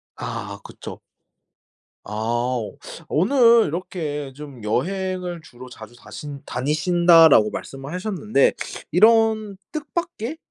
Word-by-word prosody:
아 - - -6
그쵸. - - -10 1.0
아 120 +4 -2 0.5
오늘 230 - +5
이렇게 155 -4 -4
좀 140 -4 -11
"여행을 180 - -2
주로 130 -3 -12
자주 115 -1 -12
다신 145 +1 -9
다니신다."라고 160 -2 +4
말씀하셨는데 180 +5 -1 0.4
이런 220 +1 +4 0.2
뜻밖의 310 -3 -4
170 Hz, 205 characters per minute, -22 LUFS, 135-210 Hz, 1.0 s, 오늘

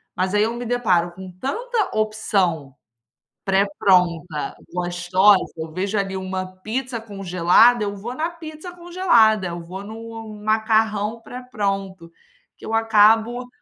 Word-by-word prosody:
Mas 185 +2 -1
aí 210 - +3
eu 225 +2 -1
me 245 0 -5
deparo 185 -8 +1
com 185 +1 -10
tanta 455 - -2
opção, 195 -9 0 0.7
pré-pronta, 180 -5 +1 0.2
gostosa, 180 +3 +2
eu 160 0 -6
vejo 195 +5 -2
ali 195 -1 -2
uma 185 0 -4 0.2
pizza 240 +1 -3
congelada, 195 +2 +3
eu 200 0 -3
vou 235 +6 -7
na 320 +3 -1
pizza 325 +1 -9
congelada, 340 - +3
eu 170 0 -6
vou 190 +4 -8
no 225 0 -9
macarrão 220 0 +1
pré-pronto 195 -8 -4 0.5
que - - -12
eu 225 - -5
acabo 225 +2 +3
210 Hz, 130 wpm, -22 LUFS, 185-230 Hz, 0.7 s, aí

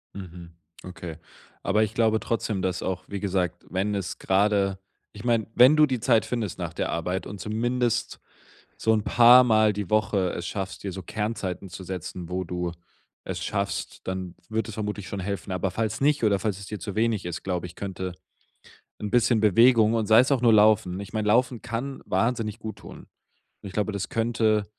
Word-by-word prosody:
Mhm, 90 -3 -9 0.3
okay. 90 -3 -8 0.5
Aber 105 +2 +2
ich 110 - -3
glaube 110 -1 +2
trotzdem, 110 -4 -2
dass 90 -1 -2
auch, 95 -1 -3
wie 100 -1 -5
gesagt, 90 -3 -2
wenn 95 +3 -1
es 90 -3 -4
grade 100 0 +2 0.4
ich 105 - -9
meine, 115 -3 +2
wenn 125 +6 +7
du 150 - +7
die 130 -4 -2
Zeit 115 -2 +3
findest 110 -8 -3
nach - - -5
der - - -2
Arbeit 90 +3 -2
und 100 0 -8
zumindest 120 +3 -1 0.6
so 110 - +1
'n 105 -2 +1
paar 120 +3 +7
Mal 110 -3 +4
die 100 -3 -5
Woche 100 -4 +2
es 85 0 -5
schaffst, 95 -1 -5
dir 100 - -3
so 95 0 -7
Kernzeiten 100 -3 -4
zu 95 +2 -9
setzen, 90 -1 -6
wo 90 +1 -2
du 90 0 -3 0.5
es - - -4
schaffst, - - -3
dann 95 -2 -4 0.2
wird 110 +1 -1
es - - -7
vermutlich 105 -2 -4
schon 100 - -5
helfen. 100 +1 -4
Aber 95 +1 -1
falls 110 +4 -2
nicht, 145 -3 +2
oder 100 -2 +3
falls 105 -3 -2
es 100 - -9
dir 105 0 -6
zu 100 +3 -6
wenig 110 -3 +1
ist, 90 -2 -5
glaube 90 -2 -2
ich, 90 - -14
könnte 95 -2 -5 0.9
'n 105 -1 -4
bisschen 120 -1 +3
Bewegung 110 +1 +5
und 110 -2 0
sei 110 +1 +7
es 130 +3 +3
auch 130 - 0
nur 115 -2 +5
Laufen. 105 -3 +4
Ich 100 - -8
meine, 110 -1 0
Laufen 120 +1 +2
kann 135 +4 -4
wahnsinnig 115 +2 -1
gut 110 0 -7
tun. - - -11 0.6
Und - - -8
ich 95 - -8
glaube, 105 +1 -1
das 100 -2 -3
könnte 110 -2 +1
105 Hz, 200 wpm, -26 LUFS, 95-115 Hz, 0.9 s, wenn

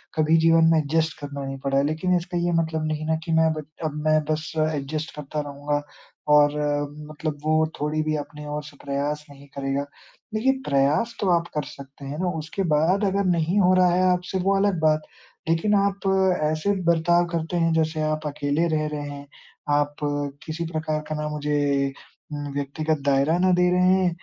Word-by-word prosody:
कभी 160 +1 +4
जीवन 165 0 +5
में 160 - +4
एडजस्ट 160 +2 0
करना 140 -1 -6
नहीं 135 0 -5
पड़ा 135 0 +1
है। 140 - +3
लेकिन 160 +4 0
इसका 175 0 -4
ये 175 0 +1
मतलब 160 -1 -2
नहीं 155 -1 -2
है 155 - -5
ना। 160 - +2
कि 165 - -3
मैं 160 0 +4
अब 155 -1 -3 0.2
अब 150 - -2
मैं 155 0 +5
बस 155 0 -2
एडजस्ट 155 0 -2
करता 150 +1 -5
रहुँगा, 145 0 -3 0.5
और 150 0 +5 0.6
मतलब 155 -1 -4
वो 155 0 +3
थोड़ी 150 +1 0
भी 155 0 0
अपने 150 0 -6
ओर 150 0 -4
से 145 -1 -13
प्रयास 145 +2 -2
नहीं 140 0 -14
करेगा। 135 0 -1 0.5
देखिए, 240 +5 +3
प्रयास 145 +12 +2
तो 195 - +1
आप 170 -1 +2
कर 150 -1 -1
सकते 140 0 -11
हैं 145 +3 -5
ना, 180 -1 0
उसके 160 +5 -3
बाद 180 +7 +2
अगर 200 +1 +1
नहीं 175 +2 +2
हो 185 -1 +5
रहा 180 -1 +5
है 185 - +2
आपसे, 180 +1 -1
वो 195 +2 +2
अलग 195 -4 +1
बात। 155 -1 +3 0.5
लेकिन 165 +6 +2
आप 200 -1 0 0.4
ऐसे 155 +6 0
बर्ताव 170 +1 +3
करते 165 +1 -2
हैं 165 -1 +2
जैसे 160 -1 0
आप 155 0 -1
अकेले 145 +3 0
रह 155 0 0
रहे 150 -1 -4
हैं, 140 0 -9 0.4
आप 145 0 +1 0.5
किसी 165 +1 -4
प्रकार 155 -1 -2
का 155 - -2
ना 150 0 -3
मुझे 150 -1 -1 0.8
उम, 145 -1 -4
व्यक्तिगत 145 +2 -1
दायरा 140 +4 +3
ना 185 0 +3
दे 180 - +4
रहे 180 0 +3
हैं 185 -1 +2
155 Hz, 195 wpm, -24 LUFS, 145-170 Hz, 0.8 s, जीवन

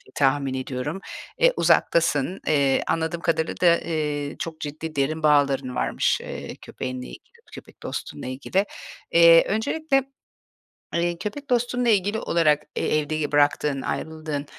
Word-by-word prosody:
tahmin 135 -1 +1
ediyorum. 130 +6 -4 0.4
Eee, - - +4
uzaktasın. 165 +1 +2
Eee, 140 -3 +2
anladığım 165 +1 -1
kadarıyla 160 -1 0
da, 170 -1 +6
eee, 150 -3 -3
çok 160 -1 -5
ciddi 155 +2 -6
derin 155 +3 -1
bağların 140 -4 +2
varmış, - - +1
eee, - - -7
köpeğinle 130 -1 -6
ilgili, - - -10 0.3
köpek - - -13
dostunla - - -6
ilgili. 145 +10 -1 0.5
Eee, 170 0 +7
öncelikle, 270 +6 0 0.9
eee, 170 0 0
köpek 215 +10 -6
dostunla 245 0 +1
ilgili 205 +1 +2
olarak, 150 -6 +2
eee, - - +1
evde, 155 +1 -3
iii, 150 -2 -2
bıraktığın, 145 -1 +2
ayrıldığın, 155 -2 -4
155 Hz, 130 wpm, -24 LUFS, 145-175 Hz, 0.9 s, Eee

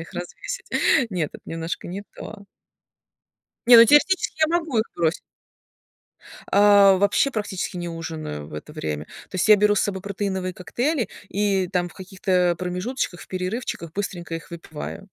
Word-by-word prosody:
их 165 - -10
развесить. 480 - -6 0.4
Нет, 170 -5 -2
это - - -11
немножко 165 +1 -5
не 195 +3 -5
то. 205 -2 -10 1.2
Не, 240 -1 +10
ну 230 - +10
теоретически 305 - +3
я 340 - +2
могу 305 -9 -2
их 220 - +2
бросить. 170 0 0 1.3
А, 200 -1 +7
вообще 205 +8 +2
практически 205 -5 -4
не 175 -1 -4
ужинаю 160 - -6
в - - -11
это 75 - -8
время. 75 -1 -4 0.2
То - - -22
есть 185 - +1
я 210 - +9
беру 210 +1 +3
с - - +2
собой 190 -2 -1
протеиновые 190 -2 -3
коктейли, 240 - -1 0.2
и 195 -3 0
там 175 -1 -1
в - - -18
каких-то 185 -1 0
промежуточках, 180 +2 -3
в - - -12
перерывчиках 185 -3 -4
быстренько 175 -4 -4
их 165 - -8
выпиваю. 165 +2 -7
190 Hz, 160 wpm, -23 LUFS, 175-210 Hz, 1.3 s, Не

